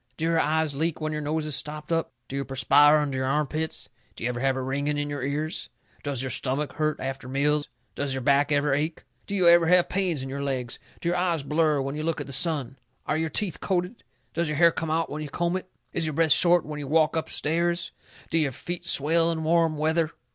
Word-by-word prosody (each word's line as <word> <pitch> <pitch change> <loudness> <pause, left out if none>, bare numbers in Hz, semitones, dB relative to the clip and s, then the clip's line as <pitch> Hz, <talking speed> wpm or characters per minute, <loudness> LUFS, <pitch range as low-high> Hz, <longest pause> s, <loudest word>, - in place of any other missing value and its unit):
Do 160 - -2
your 165 0 +2
eyes 155 -1 +1
leak 160 +3 -1
when 155 -1 -2
your 150 0 -3
nose 150 +1 -2
is 150 -2 0
stopped 150 +1 -3
up? 165 0 0 0.2
Do 135 - -6
you 140 - -1
perspire 140 +3 +5
under 140 -3 -1
your 130 - -1
arm 150 +3 +1
pits? 155 +3 -4 0.3
Do - - -8
you 125 - 0
ever 120 - -5
have 135 +1 +1
a 130 - -2
ringing 140 +3 -1
in 145 0 -2
your 145 -2 -4
ears? 150 +3 -3 0.3
Does 140 -3 -2
your 130 - -3
stomach 140 +3 -1
hurt 155 -1 0
you - - -6
after 135 -1 -5
meals? 145 +2 +1 0.2
Does 140 -2 -2
your 130 - -3
back 140 +2 +3
ever 145 -1 +2
ache? 155 +3 -2 0.2
Do 200 - -3
you 185 -3 +3
ever 170 -1 +6
have 180 0 +4
pains 180 -7 0
in - - -5
your 140 +1 -4
legs? 130 -4 -3 0.2
Do 170 - 0
your 175 - +1
eyes 175 -4 0
blur 150 0 +2
when 135 +1 -3
you 155 - -3
look 165 0 -1
at 145 - -4
the 140 - -8
sun? 140 -3 -1 0.3
Are - - 0
your 160 0 -1
teeth 175 +1 -1
coated? 185 +4 -2 0.3
Does 170 -1 0
your 150 -1 -2
hair 170 +1 +6
come 165 -1 -4
out 165 +1 0
when 150 +1 -4
you 150 - -5
comb 175 +4 -1
it? 185 0 -5 0.2
Is 160 - 0
your 155 - -2
breath 160 +1 +2
short 175 +1 +5
when 150 0 -6
you 145 - -5
walk 155 +2 +3
up 160 - -2
stairs? 170 +3 0 0.4
Do 165 - +3
your 145 -4 0
feet 175 +5 -4
swell 165 +4 +3
in 160 -1 -3
warm 165 -1 +2
weather? 160 +1 +1
155 Hz, 250 wpm, -26 LUFS, 140-165 Hz, 0.4 s, ever